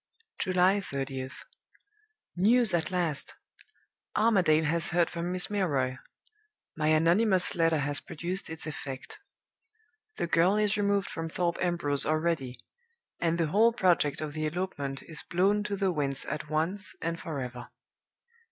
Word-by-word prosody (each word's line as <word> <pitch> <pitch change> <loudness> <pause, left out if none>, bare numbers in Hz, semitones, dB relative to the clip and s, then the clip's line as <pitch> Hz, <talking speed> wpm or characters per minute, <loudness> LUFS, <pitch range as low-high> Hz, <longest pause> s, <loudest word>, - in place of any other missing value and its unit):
"July 185 +1 +3
30th. 135 -5 -5 0.9
News 220 +4 +5
at 170 -1 +1
last! 175 -6 -1 0.8
Armadale 185 -8 +3
has 165 +2 +4
heard 175 -1 +1
from 170 +1 -3
Miss 180 +2 +2
Milroy. 140 -11 0 0.8
My 155 -1 -1
anonymous 175 +5 +3
letter 165 -1 +2
has 145 0 +1
produced 180 +3 -4
its 160 0 -2
effect. 135 -4 -7 1.0
The - - -2
girl 170 +3 +3
is 210 0 +2
removed 200 -1 +1
from 165 0 -4
Thorpe 170 +1 -1
Ambrose 170 -6 +1
already; 155 -6 -1 0.6
and 170 -1 0
the 165 -3 0
whole 225 +6 +4
project 175 -10 +2
of 155 -1 -4
the 155 0 -2
elopement 150 -5 -4
is 155 -4 -5
blown 195 +4 +1
to 205 - -2
the 195 -1 0
winds 140 -4 -2
at 150 -1 -5
once 170 +6 -2
and 165 0 -3
forever. 125 -6 -6
170 Hz, 135 wpm, -29 LUFS, 150-185 Hz, 1.0 s, News